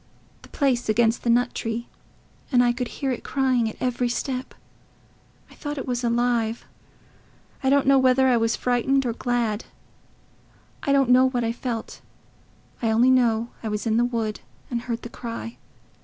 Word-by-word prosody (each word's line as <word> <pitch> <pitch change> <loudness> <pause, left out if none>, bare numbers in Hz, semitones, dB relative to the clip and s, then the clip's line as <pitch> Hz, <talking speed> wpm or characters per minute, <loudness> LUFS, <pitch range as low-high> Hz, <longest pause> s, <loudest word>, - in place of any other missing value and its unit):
the - - -16
place 255 -5 0
against 225 +1 +2
the 235 - -2
nut 245 +1 +3
tree; 230 +1 -4 0.6
and 245 -2 +5
I 240 0 +3
could 250 0 -3
hear 270 +2 -3
it 250 - -4
crying 255 -4 +1
at - - -10
every 250 -1 0
step.... 255 +1 -3 1.0
I - - -14
thought 290 0 -6
it 270 - -4
was 245 -1 -2
alive.... 235 -1 0 1.0
I 265 - +2
don't 280 0 +3
know 275 0 +5
whether 260 0 +4
I 250 - +4
was 225 0 +1
frightened 255 +2 +1
or 235 - 0
glad... 235 -3 -1 1.2
I 280 - 0
don't 275 -3 +3
know 255 +1 +6
what 245 -2 -1
I 230 - 0
felt. 235 -1 -5 0.8
I 225 - +1
only 235 +4 +4
know 235 -2 +2
I 225 - -4
was 210 +1 -3
in 225 0 +1
the 240 - +3
wood 225 -3 -2 0.3
and 235 -1 -1
heard 235 -1 -4
the - - -5
cry. 230 -1 -7
245 Hz, 175 wpm, -24 LUFS, 230-255 Hz, 1.2 s, know